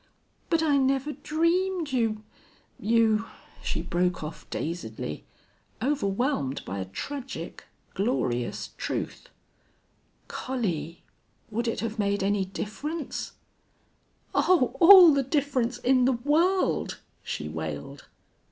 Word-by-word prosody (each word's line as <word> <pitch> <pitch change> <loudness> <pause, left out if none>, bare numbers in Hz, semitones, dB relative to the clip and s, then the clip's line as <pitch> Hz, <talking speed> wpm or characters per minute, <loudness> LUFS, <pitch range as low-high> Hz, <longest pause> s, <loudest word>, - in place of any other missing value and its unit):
"But 330 -2 +2
I 290 -3 +3
never 270 +2 +1
dreamed 335 +2 0
you 225 -4 0 0.6
you 225 0 +3 0.2
" - - -24
She - - -2
broke 180 -1 0
off 155 +1 -8
dazedly, 110 - -4 0.5
overwhelmed 235 - 0
by 95 +2 -4
a 95 - -3
tragic, 265 - -6 0.3
glorious 125 - -1
truth. - - -4 1.0
"Collie!... 185 - -3 0.5
Would 235 +3 -1
it 230 - -1
have 225 0 -4
made 200 -1 +1
any 200 0 +1
difference?" 285 - -5 1.0
"Oh, 270 -9 +3
all 355 -2 +10
the 280 - +3
difference 265 -3 0
in 250 0 +3
the 265 - +4
world!" 315 +10 +1 0.2
she 75 - -4
wailed. 75 -2 -6
240 Hz, 105 wpm, -27 LUFS, 190-290 Hz, 1.0 s, all